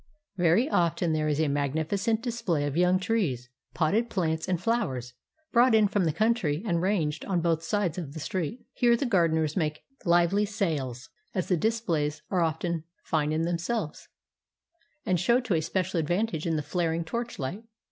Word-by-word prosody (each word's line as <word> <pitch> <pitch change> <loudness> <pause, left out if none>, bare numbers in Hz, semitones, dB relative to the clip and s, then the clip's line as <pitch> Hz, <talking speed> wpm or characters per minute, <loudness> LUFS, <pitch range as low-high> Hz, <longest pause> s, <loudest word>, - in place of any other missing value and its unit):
Very 180 - +3
often 170 - +1
there 155 0 0
is 150 0 0
a 160 - +2
magnificent 160 - 0
display 225 - -1
of 145 -1 -3
young 180 +2 +4
trees, 180 - -1 0.3
potted 205 +9 +1
plants, 160 -5 -1
and 180 -2 +1
flowers, 170 - -1 0.4
brought 240 -1 +5
in 215 -1 +5
from 200 -2 +1
the 160 - +2
country 190 -4 +1
and 170 -5 +1
ranged 170 -6 0
on 185 -3 0
both 165 -1 +1
sides 180 0 -1
of 150 -4 -7
the - - -5
street. 180 - -3
Here 240 -1 +3
the 275 - -1
gardeners 160 - +2
make 155 -4 -1 0.2
hvely 175 +3 +3
sales, 150 - -2 0.3
as 185 - -1
the 180 - +4
displays 160 -8 0
are 185 -3 +2
often 165 0 -1 0.2
fine 155 -2 0
in 155 +1 0
themselves, 175 +2 -2 1.0
and 185 -2 +1
show 235 +8 +3
to 235 -6 -1
a 160 - +2
special 185 +2 -1
advantage 175 +1 -1
in 165 - +1
the 150 - -1
flaring 165 0 -1
torchlight. 215 - -4
170 Hz, 170 wpm, -28 LUFS, 155-205 Hz, 1.0 s, brought